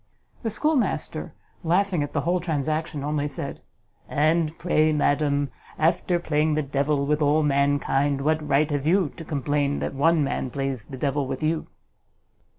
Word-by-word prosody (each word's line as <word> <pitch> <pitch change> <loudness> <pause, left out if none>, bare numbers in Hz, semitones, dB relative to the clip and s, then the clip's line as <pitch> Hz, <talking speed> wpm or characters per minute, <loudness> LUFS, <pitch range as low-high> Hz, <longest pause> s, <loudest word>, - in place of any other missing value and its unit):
The 225 - -1
schoolmaster, 290 +4 -1 0.3
laughing 180 0 +2
at 145 - -3
the 145 - 0
whole 175 +5 +1
transaction, 155 -2 -2
only 145 0 -1
said, - - -5 0.5
"And 155 +2 +1
pray, 155 -3 +2
madam, 145 -1 +1 0.3
after 170 +2 +2
playing 155 -2 +1
the 155 - 0
devil 140 +1 0
with 150 +2 +1
all 150 +2 +3
mankind, 140 -1 +1
what 155 +1 0
right 150 +2 +3
have 145 0 -1
you 180 -2 +3
to 165 - -8
complain 145 -2 -1
that - - -3
one 155 +3 +3
man 135 -1 -2
plays 135 -2 -3
the 135 - -8
devil 140 0 -1
with 130 +3 -4
you?" 155 +1 0
150 Hz, 155 wpm, -25 LUFS, 140-160 Hz, 0.5 s, all